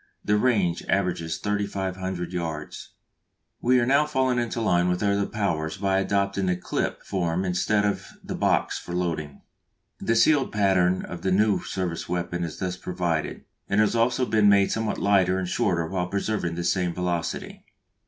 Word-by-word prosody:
The 105 Hz, -, +3 dB
range 105 Hz, -7 st, +1 dB
averages 85 Hz, -4 st, 0 dB
3500 95 Hz, -3 st, -3 dB
yards. 80 Hz, -4 st, -5 dB, 0.7 s
We 125 Hz, +1 st, +4 dB
are 120 Hz, -, +2 dB
now 140 Hz, +4 st, +3 dB
falling 130 Hz, -4 st, +1 dB
into 120 Hz, 0 st, -2 dB
line 90 Hz, -5 st, +2 dB
with 90 Hz, +2 st, -1 dB
other 100 Hz, 0 st, +1 dB
powers 80 Hz, -6 st, -2 dB
by 95 Hz, -1 st, +1 dB
adopting 100 Hz, 0 st, 0 dB
the 90 Hz, -, +2 dB
"clip" 90 Hz, -, -3 dB
form 90 Hz, -1 st, -1 dB
instead 105 Hz, +3 st, +1 dB
of 100 Hz, -, -1 dB, 0.2 s
the -, -, -5 dB
box -, -, +1 dB
for 85 Hz, -, -8 dB
loading. 80 Hz, -5 st, -3 dB, 0.6 s
The 115 Hz, -, 0 dB
sealed 140 Hz, +3 st, +4 dB
pattern 95 Hz, -3 st, +2 dB
of 85 Hz, -2 st, -7 dB
the 95 Hz, -, 0 dB
new 105 Hz, +2 st, +3 dB
service 90 Hz, -4 st, -4 dB
weapon 90 Hz, 0 st, -2 dB
is 80 Hz, -2 st, -5 dB
thus 90 Hz, -1 st, -3 dB
provided, 90 Hz, -3 st, -2 dB, 0.2 s
and 100 Hz, -, +2 dB
has 110 Hz, +1 st, +3 dB
also 125 Hz, +3 st, +2 dB
been 110 Hz, -3 st, +4 dB
made 100 Hz, -1 st, +4 dB
somewhat 110 Hz, -1 st, -1 dB
lighter 95 Hz, -2 st, +3 dB
and 95 Hz, -1 st, -2 dB
shorter 90 Hz, -5 st, 0 dB
while 90 Hz, +1 st, -2 dB
preserving 100 Hz, -3 st, -2 dB
the 85 Hz, -, -3 dB
same 90 Hz, 0 st, 0 dB
velocity. 90 Hz, -2 st, -3 dB
95 Hz, 165 wpm, -25 LUFS, 90-105 Hz, 0.7 s, We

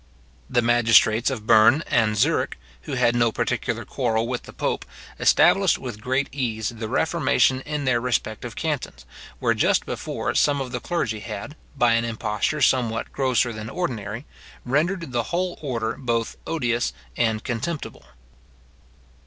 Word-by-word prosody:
The 120 Hz, -, +2 dB
magistrates 115 Hz, -1 st, +4 dB
of 105 Hz, -, -5 dB
Berne 115 Hz, +6 st, +6 dB
and 110 Hz, -2 st, +1 dB
Zurich, -, -, +1 dB, 0.3 s
who -, -, -5 dB
had 125 Hz, -2 st, +2 dB
no 115 Hz, -1 st, +3 dB
particular -, -, -2 dB
quarrel 115 Hz, -3 st, -1 dB
with 125 Hz, 0 st, -2 dB
the -, -, -7 dB
pope, -, -, -2 dB, 0.4 s
established -, -, +4 dB
with 115 Hz, -5 st, -7 dB
great 130 Hz, +4 st, 0 dB
ease 115 Hz, -6 st, -2 dB
the 115 Hz, -2 st, -6 dB
reformation 140 Hz, -2 st, +2 dB
in 150 Hz, -1 st, -2 dB
their 120 Hz, -2 st, +2 dB
respective 115 Hz, -3 st, -2 dB
cantons, -, -, -3 dB, 0.3 s
where -, -, +1 dB
just -, -, +2 dB
before -, -, -3 dB
some 145 Hz, -1 st, +2 dB
of 130 Hz, -2 st, -4 dB
the 125 Hz, -, -3 dB
clergy 120 Hz, -9 st, -2 dB
had, 110 Hz, +6 st, -7 dB, 0.2 s
by 120 Hz, -3 st, +4 dB
an 115 Hz, 0 st, +2 dB
imposture 115 Hz, +5 st, -2 dB
somewhat 120 Hz, -3 st, +1 dB
grosser 125 Hz, -3 st, +1 dB
than 110 Hz, 0 st, -6 dB
ordinary, 115 Hz, -, -4 dB, 0.4 s
rendered 160 Hz, +4 st, 0 dB
the 120 Hz, -1 st, +1 dB
whole 180 Hz, +1 st, -2 dB
order 115 Hz, -6 st, -2 dB
both 115 Hz, -3 st, -1 dB
odious 120 Hz, -7 st, 0 dB, 0.2 s
and 110 Hz, -2 st, 0 dB
contemptible. 140 Hz, -, -4 dB
120 Hz, 145 wpm, -24 LUFS, 110-135 Hz, 0.4 s, Berne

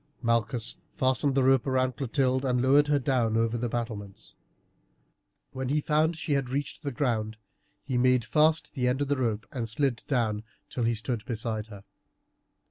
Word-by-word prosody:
Malchus 115 Hz, 0 st, 0 dB, 0.2 s
fastened 130 Hz, +1 st, +2 dB
the 135 Hz, -, +3 dB
rope 135 Hz, 0 st, +3 dB
round 130 Hz, -1 st, +1 dB
Clotilde, 130 Hz, 0 st, 0 dB
and 125 Hz, -2 st, +1 dB
lowered 140 Hz, +3 st, +4 dB
her 145 Hz, 0 st, +3 dB
down 120 Hz, -4 st, +1 dB
over 115 Hz, 0 st, +1 dB
the 120 Hz, 0 st, -2 dB
battlements. 110 Hz, -3 st, -5 dB, 1.2 s
When 130 Hz, -1 st, -4 dB
he 150 Hz, +2 st, +2 dB
found 155 Hz, +2 st, +1 dB
that -, -, -12 dB
she 160 Hz, -, -4 dB
had 135 Hz, -3 st, 0 dB
reached 140 Hz, +2 st, -3 dB
the 145 Hz, -2 st, -3 dB
ground 115 Hz, -4 st, -1 dB, 0.5 s
he 130 Hz, -3 st, -1 dB
made 125 Hz, -2 st, +3 dB
fast 155 Hz, +7 st, +2 dB
the 125 Hz, -4 st, 0 dB
end 125 Hz, +3 st, 0 dB
of 140 Hz, -, -5 dB
the 145 Hz, -, +1 dB
rope 115 Hz, -4 st, -1 dB
and 120 Hz, -5 st, -3 dB
slid 120 Hz, +1 st, 0 dB
down 115 Hz, -6 st, 0 dB, 0.3 s
till 120 Hz, -, -1 dB
he 115 Hz, 0 st, +1 dB
stood 110 Hz, 0 st, -3 dB
beside 110 Hz, -2 st, -3 dB
her. 100 Hz, -3 st, -11 dB
125 Hz, 180 wpm, -28 LUFS, 115-135 Hz, 1.2 s, lowered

